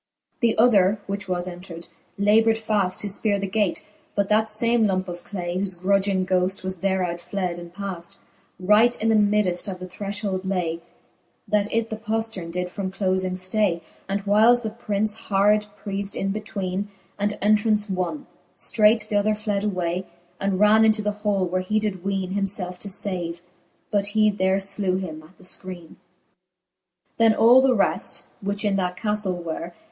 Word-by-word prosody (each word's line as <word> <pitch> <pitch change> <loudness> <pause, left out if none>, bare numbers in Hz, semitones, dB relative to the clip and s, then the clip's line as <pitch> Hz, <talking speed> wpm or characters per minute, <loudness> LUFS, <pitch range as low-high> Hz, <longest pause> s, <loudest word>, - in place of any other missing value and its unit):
XXXVIL - - -51
The 230 -2 +2
other, 210 -3 +4
which 200 -1 -4
was 180 0 -1
entred, 175 -1 -8 0.3
laboured 220 +3 +4
faft: 210 -4 0
To 210 - -1
fperre 200 +1 +1
the 195 - -2
gate; 200 -1 -1 0.3
but 200 -1 0
that 220 +1 +3
fame 230 +1 +3
lumpe 185 -1 -1
of 175 0 -7
clay, 175 -3 -4
Whofe 185 -3 -3
grudging 195 0 +2
ghoft 185 +1 0
was 185 -1 -4
thereout 185 -2 -1
fled 180 -2 -3
and 170 0 -10
paft 180 -2 -7 0.4
j 185 - -9
R 210 - +6
ight 240 +2 +3
in 225 - +1
the - - +4
middeft: 205 -3 +2
of 185 - -6
the 185 - -6
thrcfhold 200 +1 -3
lay, 180 -4 -1 0.7
That 210 -1 +1
it 230 0 0
the 220 - -3
poft:erne 220 -5 -3
did 180 +1 -3
from 195 -1 -3
doling 185 -1 -1
ftay: 185 -1 0 0.3
The 195 - -1
whiles 225 +4 +5
the 220 - -3
Prince 215 -2 -1
hard 210 -1 +2 0.2
preafed 200 0 -3
in 195 0 -1
betweene, 200 -2 -3 0.3
And 205 +1 0
entraunce 210 0 +2
wonne. 190 +9 -3 0.3
Streight 215 0 +3
th'other 210 0 +1
fled 210 -1 -2
away> 185 -2 -2 0.3
And 195 -1 0
ran 210 +1 +6
into 220 -1 +3
the 210 - +1
hall, 200 -3 +1
where 185 +1 -1
he 210 +4 -1
did 205 -4 -2
weene 195 -1 -2
Himielfe 195 -2 0
to - - -7
fave: 180 -4 -3 0.5
but 200 -1 +2
he 215 -1 +5
there 190 -1 +1
flew 195 -1 -1
him 160 -5 -5
at 160 +4 -19
the - - -18
fkreene. 185 0 -3 0.2
XXXVIII. - - -15 1.2
Then 225 -1 +5
all 240 +3 +7
the 260 -1 +4
reft, 200 - 0 0.2
which 200 +1 -2
in 200 -1 +2
that 180 -1 -1
caftle 200 -3 -1
were. 170 +1 -5
200 Hz, 180 wpm, -24 LUFS, 185-210 Hz, 1.2 s, all